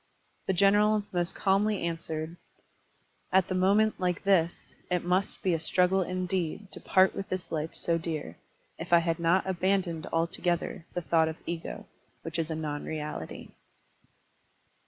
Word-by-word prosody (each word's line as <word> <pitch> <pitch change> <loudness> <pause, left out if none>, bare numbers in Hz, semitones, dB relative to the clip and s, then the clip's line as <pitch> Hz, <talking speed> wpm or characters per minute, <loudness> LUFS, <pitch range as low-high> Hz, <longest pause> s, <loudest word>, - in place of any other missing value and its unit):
The 190 - +2
general 205 +3 +4
most 175 0 0
calmly 200 0 +1
answered: 165 -1 -4 1.0
*'At 190 -1 +4
the - - 0
moment 200 +4 +3
like 180 -1 -1
this 175 -4 +1 0.2
It 180 -1 0
must 185 +3 0
be 185 - +2
a 165 - 0
struggle 180 +4 +3
indeed 185 +1 -2
To - - -8
part 190 0 +4
with 195 - -5
this 185 -1 -3
Ufe 160 0 -3
so 165 -1 +1
dear, 155 - -4 0.4
If - - -7
I - - +9
had 170 0 0
not 170 +3 +3
abandoned 185 -3 0
altogether 170 0 -1
The 175 - -2
thought 160 +2 +3
of 160 0 -4
ego, 170 -1 -5 0.4
which 165 0 -4
is 165 0 -1
a 160 - -2
non 150 -2 -3
reahty. 150 - -6
175 Hz, 155 wpm, -29 LUFS, 165-190 Hz, 1.0 s, I